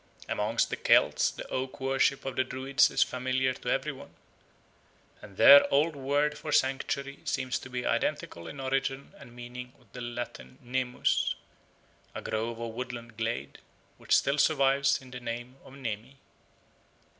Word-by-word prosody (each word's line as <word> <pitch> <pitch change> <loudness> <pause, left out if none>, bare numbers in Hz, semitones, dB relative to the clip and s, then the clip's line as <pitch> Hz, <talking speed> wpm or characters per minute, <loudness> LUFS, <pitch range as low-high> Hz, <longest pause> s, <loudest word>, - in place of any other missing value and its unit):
Amongst 110 +3 0
the - - -2
Celts - - +4
the - - -8
oak 130 0 -4
worship 135 +1 +1
of 135 - -4
the 130 - +2
Druids 135 +3 +2
is - - +3
familiar 130 0 -1
to 125 - -6
every 135 +4 0
one, 135 -1 -13 1.1
and 100 -2 -13
their 140 0 +9
old 150 +3 +3
word 145 +2 0
for 155 - -5
sanctuary 140 +1 0
seems 130 -1 -1
to - - -10
be 125 -1 -4
identical 85 -1 -1
in 140 - -8
origin 135 +3 -2
and 120 - -14
meaning 125 +1 -8
with - - -27
the 125 - -7
Latin 120 +1 -6
nemus, 125 0 0 0.8
a - - -4
grove 115 +1 -3
or 115 -1 -5
woodland 120 -1 -6
glade, 115 +1 -3 0.4
which - - +3
still 140 +1 +1
survives 140 -2 +3
in 130 - -14
the 125 - -6
name 120 +2 -6
of 130 - -14
Nemi. 125 0 -6
130 Hz, 155 wpm, -29 LUFS, 120-135 Hz, 1.1 s, their